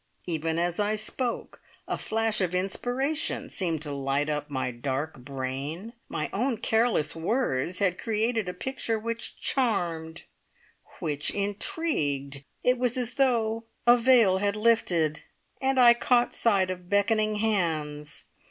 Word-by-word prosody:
Even 160 Hz, -1 st, 0 dB
as 175 Hz, +1 st, 0 dB
I 210 Hz, +1 st, +1 dB
spoke 235 Hz, +3 st, -4 dB, 0.3 s
a -, -, -1 dB
flash 225 Hz, -1 st, -1 dB
of 180 Hz, -1 st, 0 dB
inspiration 250 Hz, -, -1 dB
seemed 165 Hz, -6 st, -2 dB
to 150 Hz, -, -3 dB
light 140 Hz, +2 st, -1 dB
up 150 Hz, 0 st, -3 dB
my 130 Hz, -2 st, -2 dB
dark 135 Hz, +4 st, -3 dB
brain. 140 Hz, -, -5 dB, 0.2 s
My -, -, -2 dB
own 240 Hz, +4 st, 0 dB
careless 220 Hz, -9 st, +1 dB
words 175 Hz, -, 0 dB
had 185 Hz, -3 st, +1 dB
created 225 Hz, -2 st, 0 dB
a -, -, -4 dB
picture 260 Hz, -4 st, -2 dB
which 230 Hz, +1 st, -5 dB
charmed, 170 Hz, -10 st, -1 dB, 0.7 s
which 145 Hz, -4 st, -1 dB
intrigued. 155 Hz, -, -2 dB, 0.2 s
It 250 Hz, 0 st, +3 dB
was 250 Hz, 0 st, +1 dB
as 245 Hz, -1 st, -2 dB
though 230 Hz, -4 st, +1 dB, 0.2 s
a 240 Hz, 0 st, +8 dB
veil 235 Hz, -6 st, +5 dB
had 200 Hz, +1 st, 0 dB
lifted, 185 Hz, -9 st, +2 dB, 0.4 s
and 265 Hz, 0 st, +2 dB
I 240 Hz, -1 st, +9 dB
caught 240 Hz, 0 st, +2 dB
sight 195 Hz, -5 st, +2 dB
of 180 Hz, -1 st, -8 dB
beckoning 215 Hz, +1 st, +2 dB
hands. 160 Hz, -9 st, -2 dB
200 Hz, 135 wpm, -27 LUFS, 160-230 Hz, 0.7 s, I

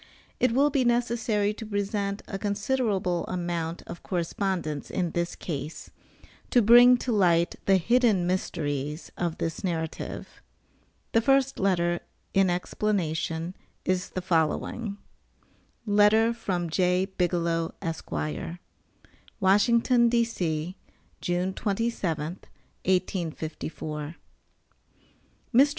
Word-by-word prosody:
It 250 Hz, -, +3 dB
will 280 Hz, +5 st, +3 dB
be 270 Hz, -2 st, +2 dB
necessary 235 Hz, -3 st, +1 dB
to 225 Hz, -, -8 dB
present 205 Hz, -1 st, -2 dB
a 195 Hz, -, -4 dB
considerable 205 Hz, -4 st, 0 dB
amount 170 Hz, -2 st, -3 dB
of -, -, -8 dB
correspondence 175 Hz, -4 st, -2 dB
in 175 Hz, -3 st, -1 dB
this 170 Hz, 0 st, -2 dB
case, 150 Hz, -1 st, -6 dB, 0.6 s
to 250 Hz, -, +5 dB
bring 245 Hz, +3 st, +8 dB
to 245 Hz, -, -3 dB
light 175 Hz, -5 st, +3 dB
the 195 Hz, -1 st, +6 dB
hidden 220 Hz, -1 st, +3 dB
mysteries 150 Hz, -4 st, -2 dB
of 170 Hz, -2 st, -2 dB
this 165 Hz, -1 st, -3 dB
narrative. 160 Hz, -4 st, -4 dB, 0.7 s
The 225 Hz, -, +4 dB
first 270 Hz, +2 st, +2 dB
letter, 175 Hz, -3 st, +2 dB, 0.3 s
in 195 Hz, -1 st, +4 dB
explanation, 175 Hz, -3 st, -1 dB, 0.3 s
is 185 Hz, -1 st, 0 dB
the 185 Hz, -, -4 dB
following: 190 Hz, +5 st, 0 dB, 0.9 s
LETTER 210 Hz, +2 st, +4 dB
FROM 180 Hz, -7 st, -2 dB
J. 180 Hz, +2 st, +2 dB
BIGELOW, 170 Hz, -3 st, -1 dB
ESQ. 85 Hz, -, -4 dB, 0.8 s
WASHINGTON, 235 Hz, +5 st, +4 dB
D.C., 185 Hz, -8 st, 0 dB, 0.5 s
June 180 Hz, +1 st, 0 dB
27, 190 Hz, -7 st, -2 dB, 0.5 s
1854. 160 Hz, -4 st, -2 dB, 1.4 s
MR. 270 Hz, +5 st, +7 dB
185 Hz, 100 wpm, -27 LUFS, 170-215 Hz, 1.4 s, bring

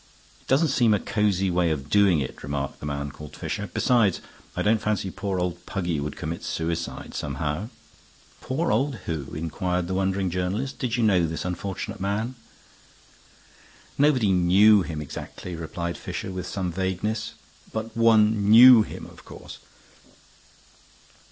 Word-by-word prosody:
"It -, -, -28 dB
doesn't 145 Hz, +4 st, +3 dB
seem 120 Hz, -5 st, +3 dB
a -, -, 0 dB
cozy 95 Hz, -3 st, 0 dB
way 85 Hz, -1 st, +2 dB
of 75 Hz, -3 st, -3 dB
doing 95 Hz, -3 st, +4 dB
it," 65 Hz, -, -6 dB
remarked 70 Hz, -1 st, -4 dB
the 75 Hz, -, -6 dB
man 70 Hz, 0 st, -3 dB
called 75 Hz, +2 st, -11 dB
Fisher. 100 Hz, -2 st, -4 dB
"Besides, 115 Hz, -6 st, +2 dB, 0.4 s
I -, -, -1 dB
don't 110 Hz, +1 st, +2 dB
fancy 105 Hz, -3 st, -1 dB
poor 100 Hz, -1 st, -3 dB
old 90 Hz, -1 st, -3 dB
Puggy 90 Hz, -6 st, -2 dB
would 70 Hz, 0 st, -4 dB
commit 80 Hz, +2 st, -5 dB
suicide, 80 Hz, 0 st, -4 dB
somehow." 75 Hz, -, -3 dB, 0.7 s
"Poor 160 Hz, +6 st, -1 dB
old 135 Hz, +5 st, +1 dB
who?" 75 Hz, -5 st, -4 dB
inquired 90 Hz, +3 st, -2 dB
the 95 Hz, -, -3 dB
wondering 95 Hz, -1 st, 0 dB
journalist. 95 Hz, +9 st, -2 dB
"Did 125 Hz, -2 st, -1 dB
you 120 Hz, -, +1 dB
know 95 Hz, -6 st, +3 dB
this 80 Hz, +2 st, -4 dB
unfortunate 90 Hz, +1 st, -4 dB
man?" 105 Hz, +6 st, -2 dB, 1.6 s
"Nobody 135 Hz, -8 st, +3 dB
knew 95 Hz, +4 st, +5 dB
him 80 Hz, -4 st, -4 dB
exactly," 85 Hz, +4 st, -8 dB
replied 85 Hz, +1 st, -5 dB
Fisher, -, -, -5 dB
with 90 Hz, -1 st, -5 dB
some 95 Hz, -3 st, -3 dB
vagueness. 95 Hz, +5 st, -2 dB, 0.4 s
"But 110 Hz, +1 st, -5 dB
one 110 Hz, -2 st, +4 dB
knew 120 Hz, +1 st, +10 dB
him, -, -, -6 dB
of -, -, -14 dB
course. -, -, -11 dB
95 Hz, 150 wpm, -25 LUFS, 85-110 Hz, 1.6 s, knew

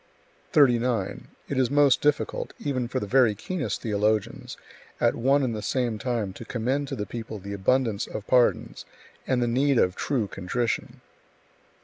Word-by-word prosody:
39. 120 Hz, -7 st, +2 dB, 0.2 s
It 135 Hz, -, -1 dB
is 130 Hz, -2 st, +2 dB
most 145 Hz, -1 st, +4 dB
difficult, 150 Hz, 0 st, 0 dB
even 130 Hz, -4 st, -2 dB
for 130 Hz, +2 st, -2 dB
the 105 Hz, -, -4 dB
very 120 Hz, -1 st, +3 dB
keenest 180 Hz, -, -4 dB
theologians, 105 Hz, -1 st, -1 dB, 0.4 s
at -, -, +3 dB
one 135 Hz, +4 st, +2 dB
and 120 Hz, -4 st, -1 dB
the 105 Hz, -, -4 dB
same 120 Hz, -1 st, -1 dB
time 115 Hz, -6 st, -2 dB
to 115 Hz, -, -9 dB
commend 130 Hz, +5 st, -2 dB
to 135 Hz, -, -4 dB
the 105 Hz, -4 st, -3 dB
people 110 Hz, -1 st, -6 dB
the 100 Hz, +1 st, -7 dB
abundance 110 Hz, +1 st, +1 dB
of 105 Hz, -, -6 dB
pardons 125 Hz, -2 st, +2 dB, 0.4 s
and 125 Hz, -2 st, +1 dB
[the -, -, 0 dB
need 135 Hz, +3 st, +2 dB
of] 90 Hz, -4 st, +2 dB
true 130 Hz, -7 st, -1 dB
contrition. 110 Hz, +6 st, -3 dB
120 Hz, 160 wpm, -26 LUFS, 110-135 Hz, 0.4 s, most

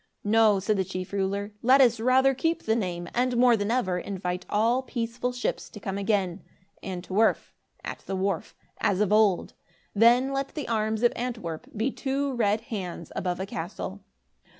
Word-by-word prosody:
"No," 215 Hz, -1 st, +4 dB
said 205 Hz, +2 st, 0 dB
the 190 Hz, -, +2 dB
chief 185 Hz, 0 st, -6 dB
ruler, 200 Hz, +1 st, -1 dB
"let 260 Hz, +3 st, +5 dB
us 240 Hz, -4 st, +5 dB
rather 260 Hz, +3 st, +4 dB
keep 325 Hz, +5 st, -1 dB
the 220 Hz, -, +1 dB
name, 175 Hz, -5 st, -3 dB
and, 250 Hz, 0 st, +1 dB
more 245 Hz, -1 st, +6 dB
than 205 Hz, -1 st, -2 dB
ever, 195 Hz, -7 st, +1 dB
invite 180 Hz, -1 st, -4 dB
all 230 Hz, +5 st, +2 dB
peaceful 240 Hz, -1 st, -3 dB
ships 245 Hz, 0 st, -3 dB
to 210 Hz, -, -10 dB
come 195 Hz, 0 st, -4 dB
again, 195 Hz, -3 st, 0 dB, 0.4 s
'an 180 Hz, -2 st, -5 dB
't 185 Hz, -, -9 dB
werf' 220 Hz, +3 st, +2 dB, 0.3 s
(at -, -, -5 dB
the 195 Hz, -, -2 dB
wharf), 190 Hz, -2 st, -2 dB, 0.2 s
as 195 Hz, -2 st, +1 dB
of 210 Hz, -1 st, +2 dB
old. 210 Hz, -4 st, +3 dB, 0.4 s
Then, 240 Hz, +5 st, +4 dB
let 275 Hz, 0 st, -3 dB
the 300 Hz, -, -4 dB
arms 220 Hz, 0 st, 0 dB
of 240 Hz, -, +4 dB
Antwerp 225 Hz, -10 st, -4 dB
be 235 Hz, +6 st, 0 dB
two 275 Hz, +1 st, -2 dB
red 215 Hz, -3 st, +1 dB
hands 185 Hz, -8 st, -6 dB
above 180 Hz, -1 st, -2 dB
a 190 Hz, -, -2 dB
castle." 160 Hz, -, -6 dB
215 Hz, 180 wpm, -27 LUFS, 190-245 Hz, 0.4 s, more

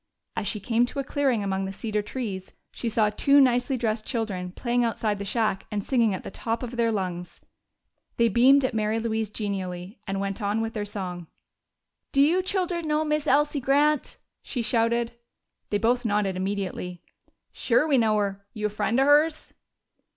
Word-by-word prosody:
As 205 Hz, -, -2 dB
she 210 Hz, -, -2 dB
came 235 Hz, +4 st, +1 dB
to 280 Hz, -, -8 dB
a 275 Hz, -, 0 dB
clearing 265 Hz, -6 st, 0 dB
among 195 Hz, -1 st, -1 dB
the 190 Hz, -, -4 dB
cedar 210 Hz, +1 st, -2 dB
trees 205 Hz, -4 st, -5 dB, 0.2 s
she 235 Hz, -, -3 dB
saw 215 Hz, -1 st, +2 dB
two 280 Hz, +6 st, +4 dB
nicely 255 Hz, 0 st, +3 dB
dressed 220 Hz, -2 st, -1 dB
children 205 Hz, -8 st, -3 dB
playing 240 Hz, +5 st, 0 dB
outside 220 Hz, -3 st, -1 dB
the 200 Hz, -, -4 dB
shack 215 Hz, -2 st, -1 dB
and 205 Hz, -1 st, -2 dB
singing 235 Hz, -3 st, +2 dB
at -, -, -7 dB
the -, -, -7 dB
top 230 Hz, +4 st, -3 dB
of 245 Hz, 0 st, -5 dB
their 230 Hz, -1 st, +2 dB
lungs. 180 Hz, -4 st, -4 dB, 0.8 s
They 235 Hz, -, +4 dB
beamed 260 Hz, +5 st, +5 dB
at 255 Hz, -, -1 dB
Mary 220 Hz, 0 st, 0 dB
Louise 220 Hz, -2 st, -1 dB
genially 195 Hz, -2 st, -4 dB
and 195 Hz, 0 st, -2 dB
went 195 Hz, +1 st, -3 dB
on 205 Hz, +2 st, 0 dB
with 225 Hz, 0 st, -2 dB
their 210 Hz, -2 st, -3 dB
song. 180 Hz, -4 st, -5 dB, 0.8 s
"Do 275 Hz, -, +5 dB
you 340 Hz, +6 st, +3 dB
children 360 Hz, -3 st, -1 dB
know 305 Hz, +1 st, +1 dB
Miss 300 Hz, 0 st, 0 dB
Elsie 295 Hz, +1 st, +3 dB
Grant?" 290 Hz, +2 st, +2 dB, 0.2 s
she 245 Hz, -4 st, -3 dB
shouted. 230 Hz, 0 st, +1 dB, 0.6 s
They 205 Hz, -, +1 dB
both 240 Hz, +4 st, +1 dB
nodded 205 Hz, -4 st, 0 dB
immediately. 185 Hz, -2 st, -3 dB, 0.5 s
"Sure 255 Hz, +5 st, +2 dB
we 275 Hz, -4 st, +4 dB
know 215 Hz, -2 st, +3 dB
her! 200 Hz, -1 st, -2 dB
You 210 Hz, -1 st, -3 dB
a -, -, +2 dB
friend 220 Hz, +4 st, 0 dB
o' 270 Hz, -, +4 dB
hers?" 300 Hz, +2 st, +3 dB
225 Hz, 185 wpm, -26 LUFS, 200-260 Hz, 0.8 s, beamed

